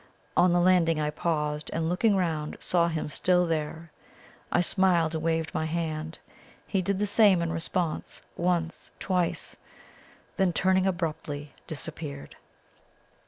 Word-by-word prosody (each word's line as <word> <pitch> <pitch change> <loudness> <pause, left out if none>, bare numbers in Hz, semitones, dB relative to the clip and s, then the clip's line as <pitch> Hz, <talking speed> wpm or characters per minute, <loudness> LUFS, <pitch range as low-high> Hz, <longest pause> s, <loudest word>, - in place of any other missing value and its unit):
On 180 - +5
the 175 - +3
landing 175 -3 +4
I 150 0 0
paused, 150 -2 -2
and, 160 0 -1
looking 195 +5 +2
round, 160 -5 -1
saw 170 -1 +2
him 160 -2 -2
still 180 +4 +2
there. 160 0 -3 0.6
I - - +3
smiled 175 -3 +2
and 160 -1 -3
waved 160 -1 0
my 160 - -1
hand. 160 -1 -3 0.5
He 195 - 0
did 195 +2 0
the 205 - +1
same 205 -3 +5
in 170 -1 -1
response, 165 0 -2
once 170 -1 -1
twice; 180 -3 -1 0.8
then 190 -2 +2
turning 190 +2 +3
abruptly, 150 -5 -3
disappeared. 70 0 -6
170 Hz, 135 wpm, -28 LUFS, 160-180 Hz, 0.8 s, On